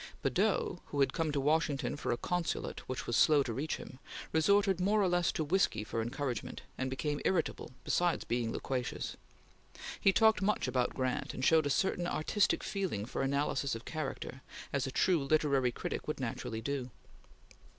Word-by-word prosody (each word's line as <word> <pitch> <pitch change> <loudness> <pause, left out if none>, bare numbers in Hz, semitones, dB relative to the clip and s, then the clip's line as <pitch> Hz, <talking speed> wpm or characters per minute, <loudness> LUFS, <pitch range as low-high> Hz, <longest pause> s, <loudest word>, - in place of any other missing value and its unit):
Badeau, - - +1
who 145 - -4
had 135 - +3
come 165 -3 0
to 145 - 0
Washington 150 0 +1
for 145 - -2
a 120 - 0
consulate 175 +3 -2
which 130 - -3
was 120 - -1
slow 150 0 +5
to 120 - -3
reach 145 +6 -2
him, 130 - -10 0.3
resorted 195 +3 +3
more 205 +3 +3
or 195 - +3
less 175 -1 +2
to 160 - -1
whiskey 150 - +1
for 115 +1 -2
encouragement, 120 0 -3
and 130 0 -2
became 145 +2 -2
irritable, 180 -4 0
besides 175 -1 +1
being 120 -1 -1
loquacious. 125 0 -3 0.8
He 195 - +5
talked 220 +2 +4
much 210 +2 +1
about 125 -1 0
Grant, 130 -1 -2
and 130 - -1
showed 160 -2 +5
a - - -1
certain 180 +2 +1
artistic 200 +5 +1
feeling 185 - -2
for 125 - -3
analysis 140 -1 0
of 115 - -8
character, 135 -4 -5 0.3
as 140 -1 0
a - - -4
true 170 +2 +2
literary 140 -3 +2
critic - - -4
would - - -3
naturally 110 0 -3
do. 135 0 -3
145 Hz, 175 wpm, -33 LUFS, 130-175 Hz, 0.8 s, slow